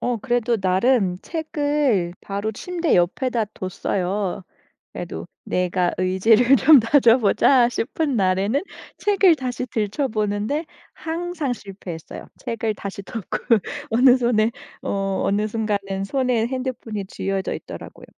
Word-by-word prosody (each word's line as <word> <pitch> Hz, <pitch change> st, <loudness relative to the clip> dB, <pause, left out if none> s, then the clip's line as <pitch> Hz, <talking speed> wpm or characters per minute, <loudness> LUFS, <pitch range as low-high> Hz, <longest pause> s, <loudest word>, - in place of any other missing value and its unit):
어 245 Hz, -1 st, 0 dB
그래도 240 Hz, 0 st, 0 dB
나름 190 Hz, 0 st, +2 dB
책을 290 Hz, -, 0 dB
바로 200 Hz, +2 st, -3 dB
침대 345 Hz, -, -1 dB
옆에다 225 Hz, +6 st, +1 dB
뒀어요. 185 Hz, +1 st, -2 dB, 0.5 s
그래도 -, -, -6 dB, 0.2 s
내가 180 Hz, 0 st, 0 dB
의지를 220 Hz, +8 st, +4 dB
좀 285 Hz, +3 st, +7 dB
다져보자 240 Hz, 0 st, +4 dB
싶은 275 Hz, +3 st, -2 dB
날에는 195 Hz, -, +1 dB, 0.4 s
책을 390 Hz, -5 st, +4 dB
다시 255 Hz, -2 st, -4 dB
들춰보는데 215 Hz, +3 st, -1 dB, 0.3 s
항상 330 Hz, -4 st, -3 dB
실패했어요. 190 Hz, -7 st, -8 dB
책을 225 Hz, -2 st, -2 dB
다시 200 Hz, 0 st, -7 dB
덮고 210 Hz, -1 st, -5 dB, 0.5 s
어느 250 Hz, +3 st, +6 dB
손에 235 Hz, -3 st, +2 dB, 0.3 s
어 195 Hz, -1 st, -1 dB
어느 205 Hz, +2 st, +1 dB
순간은 200 Hz, -3 st, -2 dB
손에 250 Hz, 0 st, 0 dB
핸드폰이 255 Hz, -6 st, -4 dB
쥐어져 195 Hz, 0 st, -3 dB
있더라고요. -, -, -9 dB
225 Hz, 270 characters per minute, -22 LUFS, 195-260 Hz, 0.5 s, 좀